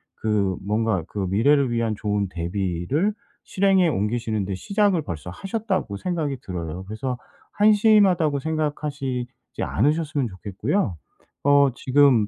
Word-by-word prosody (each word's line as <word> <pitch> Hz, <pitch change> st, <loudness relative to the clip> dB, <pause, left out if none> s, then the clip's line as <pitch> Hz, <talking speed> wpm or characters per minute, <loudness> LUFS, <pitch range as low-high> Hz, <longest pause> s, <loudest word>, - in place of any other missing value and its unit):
그 100 Hz, -4 st, 0 dB
뭔가 105 Hz, -3 st, 0 dB
그 105 Hz, -, -6 dB
미래를 130 Hz, +6 st, +3 dB
위한 115 Hz, -2 st, 0 dB
좋은 105 Hz, -1 st, -1 dB
대비를 95 Hz, -, -1 dB, 0.3 s
실행에 190 Hz, -2 st, +3 dB
옮기시는데 105 Hz, -5 st, -1 dB
시작을 200 Hz, -, +1 dB
벌써 85 Hz, -, -6 dB
하셨다.'고 195 Hz, -, -3 dB
생각이 155 Hz, -, -2 dB
들어요. 90 Hz, -2 st, -5 dB
그래서 125 Hz, +5 st, -4 dB, 0.4 s
한심하다고 205 Hz, -8 st, +4 dB
생각하시지 145 Hz, -4 st, -2 dB, 0.3 s
않으셨으면 150 Hz, +1 st, +1 dB
좋겠고요. 100 Hz, -, -2 dB, 0.5 s
어 140 Hz, 0 st, +5 dB
지금 130 Hz, -5 st, +4 dB
130 Hz, 305 characters per minute, -23 LUFS, 100-160 Hz, 0.5 s, 어